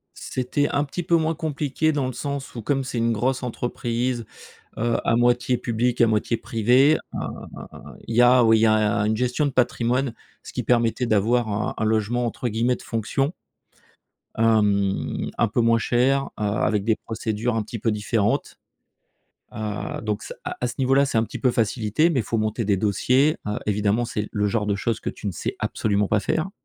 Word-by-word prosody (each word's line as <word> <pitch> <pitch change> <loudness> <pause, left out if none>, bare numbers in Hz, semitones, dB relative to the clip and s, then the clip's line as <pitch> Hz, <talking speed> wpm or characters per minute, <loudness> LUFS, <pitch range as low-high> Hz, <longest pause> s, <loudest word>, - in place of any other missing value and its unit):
C'était 130 +3 -1
un 145 - 0
petit 150 +5 -5
peu 170 0 +3
moins 160 0 +1
compliqué, 155 -1 -1
dans 145 -3 -1
le 130 - -3
sens 140 +2 -5
où, 115 - -6
comme 135 +4 0
c'est 125 -2 -4
une 115 0 +2
grosse 125 +4 0
entreprise, 120 0 -2 0.5
heu, 115 +1 +1
à 115 - +2
moitié 120 +1 +2
publique, 120 0 -1
à 120 - +7
moitié 110 +1 +1
privée, 125 +9 +3 0.2
heu, - - -3 0.9
il 115 - -3
y 120 - +6
a 125 0 +6
où 115 -1 +5
il 110 - +5
y 115 - +4
a 110 -2 +3
une 110 +1 +1
gestion 125 +5 0
de 140 - 0
patrimoine, 125 0 +1 0.3
ce - - -10
qui - - -2
permettait 120 0 +1
d'avoir 115 +2 +2
un 105 +1 -2
un - - -1
logement 110 +3 +1
entre 120 +2 -3
guillemets 115 +3 +1
«de - - -13
fonction» 135 +7 -1 1.0
hem, 105 -3 +1
un 115 - +3
peu 115 +3 0
moins 115 0 +4
cher, 130 +4 +2
heu, - - -2
avec 105 0 0
des 110 0 +2
procédures 110 +1 -3
un 110 - 0
petit 110 +2 -7
peu 115 - 0
différentes, 105 0 -1 1.0
heu. 105 -1 -4
Donc 105 -1 -3
ce, - - -7
heu, - - -22 0.2
à 125 - +1
ce 120 - -6
niveau 135 0 +2
là, 140 +1 +5
ça 135 - -1
a - - +4
un - - +1
petit - - -7
peu 130 - +2
facilité, 115 +6 +1
mais 140 -7 +1
faut 115 - -2
monter 110 +2 -1
des 100 -1 +2
dossiers, 125 +9 +2
heu, 105 - -2
évidemment, 105 +3 +1
c'est 105 -2 -3
le 105 -1 0
genre 105 0 0
de 105 -1 0
choses 110 +3 -1
que - - -3
tu - - -7
ne - - -1
sais - - -4
absolument 105 -1 0
pas 105 - +2
faire 160 - -1
115 Hz, 205 wpm, -23 LUFS, 110-125 Hz, 1.0 s, à